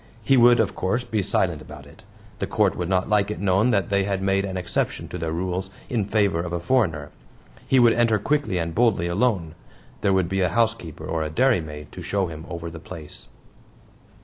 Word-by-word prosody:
He 135 +5 +4
would, 120 -1 +6
of 110 -4 +1
course, 120 +7 -1
be 110 -4 -1
silent - - 0
about - - -11
it; - - -16 0.4
the - - -2
Court - - +1
would 90 -1 -3
not 95 -1 +1
like 105 -1 +2
it 105 - -4
known 100 +4 +2
that 100 -5 +1
they 100 0 +2
had 95 -1 -1
made 95 0 +1
an 95 -1 -4
exception 90 -1 -2
to 90 - -6
their 80 -1 -2
rules 90 +2 -3 0.2
in 115 -5 0
favor 100 -4 +1
of 85 0 -3
a 85 - -1
foreigner; 85 - 0 0.6
he 135 - +3
would 120 -2 +6
enter 115 -2 +3
quickly 140 -2 0
and 85 -1 -2
boldly 115 -6 +2
alone. 90 -3 0 0.5
There 100 - +2
would 95 -2 +2
be 95 +2 -1
a 90 - +2
housekeeper 110 -6 -1
or 80 - -2
a 80 - -2
dairymaid 80 - 0
to - - -9
show 100 -1 -1
him 80 0 -8
over 85 -1 -6
the 80 - -9
place. 80 -2 -10
95 Hz, 210 wpm, -24 LUFS, 85-110 Hz, 0.6 s, would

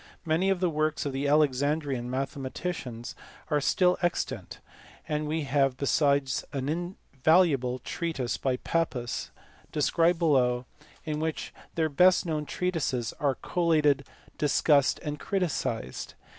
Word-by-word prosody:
Many 165 +4 +2
of 195 -2 +1
the 180 - +3
works 155 0 0
of 140 - -2
the 135 +2 -1
Alexandrian 145 -2 +1
mathematicians 135 -1 -4 0.4
are 150 -1 +2
still 180 +5 +3
extant; 175 -1 -2 0.5
and 150 0 -1
we 155 +1 -1
have 135 -1 +1
besides 140 -2 +2
an 135 -2 -3
invaluable 160 -5 +1
treatise 140 -2 -3
by 130 -2 -1
Pappus, 125 -8 -2 0.4
described 165 +3 +2
below, 130 -7 +2 0.4
in 155 -1 -2
EUCLID. - - -3
53 - - -3
which 160 0 -3 0.2
their 160 -1 +1
best 180 +6 +4
known 155 -3 -2
treatises 145 -10 -1
are 140 -4 +1
collated, 155 -5 +2 0.3
discussed, 145 -1 +3
and 150 -1 -4
criticized. 175 - -2
150 Hz, 130 wpm, -28 LUFS, 135-165 Hz, 0.5 s, best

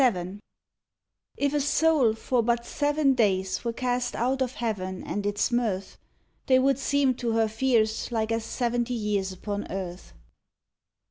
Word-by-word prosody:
VII 190 -6 +1 1.0
If 285 0 +1
a 295 - +2
soul 290 -5 +3
for 245 +2 0
but 235 +1 0
seven 290 0 +2
days 190 -6 +1
were 235 - -1
cast 245 +1 -1
out 260 +3 0
of 255 -1 0
heaven 190 -6 -3
and 205 0 -3
its 205 +5 0
mirth, 215 -6 -1 0.5
They 260 - +6
would 270 0 +2
seem 275 -1 +2
to 235 -2 -1
her 225 0 +3
fears 220 -1 +1
like 225 -1 -1
as 225 0 0
seventy 240 +1 -1
years 205 -3 -1
upon 205 +2 -5
earth. 180 - -6
235 Hz, 150 wpm, -27 LUFS, 205-260 Hz, 1.0 s, They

